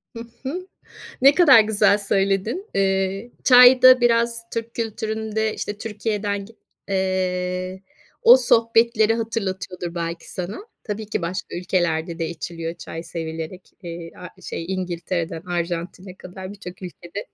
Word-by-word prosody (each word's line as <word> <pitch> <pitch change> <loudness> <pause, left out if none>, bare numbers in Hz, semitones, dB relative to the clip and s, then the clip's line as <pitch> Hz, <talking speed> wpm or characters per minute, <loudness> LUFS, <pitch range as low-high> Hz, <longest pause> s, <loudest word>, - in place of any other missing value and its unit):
Hı - - -6 0.2
hı. 355 +8 -5 0.6
Ne 275 +2 +7
kadar 290 -9 +8
güzel 210 -1 +3
söyledin. 200 - 0
Eee, 195 +3 0
çay 250 0 +8
da 255 0 +8
biraz 235 -1 +2
Türk 230 0 -4
kültüründe, 220 -1 -2
işte, 205 0 -5
Türkiye'den 210 -2 -3
gi 225 +3 -16 0.3
eee, 185 -1 -2 0.4
o 245 - +9
sohbetleri 230 -2 +3
hatırlatıyordur 190 -6 -4
belki 170 -1 -5
sana. 185 - -5 0.2
Tabii 215 0 -5
ki 210 -2 -3
başka 170 +1 -4
ülkelerde 170 -2 -1
de 165 -1 -2
içiliyor 165 0 -5
çay 165 -1 -8
sevilerek. 165 +2 -7
Eee, 170 -1 -7
a 180 - -11
şey 165 - -5
İngiltere'den 175 -2 -3
Arjantin'e 175 +1 -4
kadar 185 +1 -9
birçok 185 -2 -11
ülkede 180 +2 -8
195 Hz, 130 wpm, -22 LUFS, 175-225 Hz, 0.6 s, o